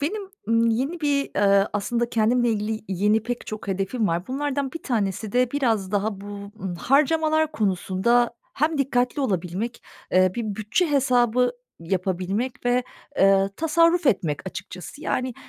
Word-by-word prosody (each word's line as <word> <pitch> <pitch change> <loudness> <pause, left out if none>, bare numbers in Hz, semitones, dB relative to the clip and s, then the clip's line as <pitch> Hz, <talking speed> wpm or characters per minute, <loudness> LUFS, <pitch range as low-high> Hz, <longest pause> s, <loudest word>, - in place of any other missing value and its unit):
Benim, 390 +9 -2 0.3
ımm, 230 0 +3
yeni 270 +9 -1
bir, 285 -2 0
ııı, 200 0 +4
aslında 235 +3 -1
kendimle 235 +2 +2
ilgili 215 0 -2
yeni 205 +3 +2
pek 245 +1 -4
çok 215 -2 -7
hedefim 195 +4 -1
var. 170 0 -1
Bunlardan 280 0 -2
1 330 - -7
tanesi 210 -4 -2
de 250 0 +2
biraz 225 -9 0
daha 205 -1 -1
bu, 200 - -9 0.3
ııı, 190 -2 -4
harcamalar 315 - +2
konusunda 215 +2 +1 0.2
hem 305 +1 0
dikkatli 250 0 +1
olabilmek, 195 0 -2 0.3
ııı, 185 0 +4
bir 235 - -3
bütçe 220 - 0
hesabı 250 -3 +3 0.3
yapabilmek 190 +8 -2
ve 245 0 +2 0.4
ııı, 195 0 +4
tasarruf 335 +1 +3
etmek 170 - +1
açıkçası. 190 +7 -9
Yani, 255 -4 -1
235 Hz, 145 wpm, -24 LUFS, 195-270 Hz, 0.4 s, ııı